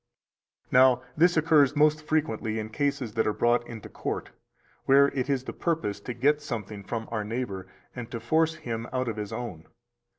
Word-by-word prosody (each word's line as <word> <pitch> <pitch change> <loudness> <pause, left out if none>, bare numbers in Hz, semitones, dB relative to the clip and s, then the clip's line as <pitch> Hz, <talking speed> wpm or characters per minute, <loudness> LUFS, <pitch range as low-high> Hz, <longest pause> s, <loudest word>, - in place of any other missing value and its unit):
301 - - -12 0.3
Now, 125 - -25
this 175 +2 +4
occurs 155 -3 +4
most 150 +1 +4
frequently 110 -8 0
in 110 0 -4
cases 140 -3 -1
that 110 0 +1
are 105 - +1
brought 120 +1 +2
into 115 -3 -8
court, - - -5 0.5
where 140 +1 +6
it 135 -1 -3
is 135 -2 +1
the - - -6
purpose 155 - -2
to 120 +4 -6
get 150 +2 +2
something 110 -7 -5
from 115 +2 -4
our 110 -2 -1
neighbor 105 -4 -4 0.3
and 120 -2 -6
to 115 - -5
force 160 +7 +2
him 115 -1 -5
out 130 -1 -1
of 110 -2 -3
his 105 -1 -4
own. 110 -9 -6
120 Hz, 190 wpm, -27 LUFS, 110-145 Hz, 0.5 s, where